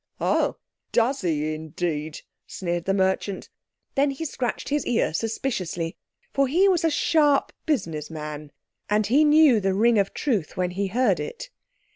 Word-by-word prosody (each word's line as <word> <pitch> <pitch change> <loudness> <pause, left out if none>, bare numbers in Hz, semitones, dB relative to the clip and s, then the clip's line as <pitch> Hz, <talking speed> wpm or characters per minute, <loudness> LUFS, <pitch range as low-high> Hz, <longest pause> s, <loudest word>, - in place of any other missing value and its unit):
_" - - -61
"Ho! - - +1 0.3
does 245 +1 +1
'e 155 -3 0
indeed," 155 -1 -4 0.3
sneered 175 -2 -3
the 195 - +1
merchant. 190 0 -1 0.4
Then 280 +1 +2
he 275 +4 -4
scratched 250 -5 -3
his 295 0 0
ear 225 -10 +1
suspiciously, 185 -5 -2 0.4
for 275 0 +2
he 355 +9 +4
was 365 -4 +2
a 325 - +4
sharp 295 -2 +2
business 165 - -1
man, 150 -2 -7 0.4
and 210 +1 +2
he 270 +9 +4
knew 300 -5 +6
the 195 -1 0
ring 225 +2 +4
of 195 -1 +1
truth 220 - -1
when 180 -1 0
he 195 +2 -2
heard 215 -1 +1
it. - - -6
205 Hz, 160 wpm, -24 LUFS, 170-275 Hz, 0.4 s, knew